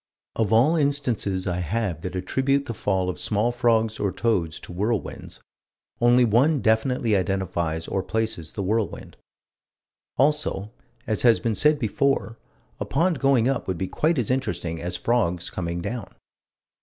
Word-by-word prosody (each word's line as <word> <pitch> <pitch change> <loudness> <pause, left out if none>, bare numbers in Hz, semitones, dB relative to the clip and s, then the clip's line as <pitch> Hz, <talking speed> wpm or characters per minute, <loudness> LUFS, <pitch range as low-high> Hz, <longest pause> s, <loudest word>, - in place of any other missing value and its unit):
Of 110 -2 0
all 125 +9 +5
instances 125 -10 0
I 90 -2 -1
have 90 -1 -2
that 90 +1 -5
attribute 135 +9 0
the 115 - -4
fall 95 -4 -1
of 90 - -3
small 110 +3 0
frogs 115 -2 +1
or 100 - 0
toads 95 -4 -1
to - - -10
whirlwinds, 105 +2 -3 0.6
only 120 +1 +5
one 135 +7 +3
definitely 115 0 +1
identifies 85 -4 -1
or 95 - -1
places 110 -7 -3
the 100 - -3
whirlwind. 110 +2 -2 1.0
Also, 135 -8 +1 0.3
as 110 - -1
has 120 -2 +5
been 115 - -1
said 150 +7 +3
before, 120 -1 0 0.4
a - - -2
pond 170 -3 +1
going 135 -4 +3
up 135 -1 -1
would 95 -2 -2
be 95 - -2
quite 160 - 0
as 125 -2 0
interesting 90 -11 -2
as 90 +1 -3
frogs 90 -5 0
coming 85 -1 -3
down. 115 +1 -5
110 Hz, 155 wpm, -24 LUFS, 95-125 Hz, 1.0 s, all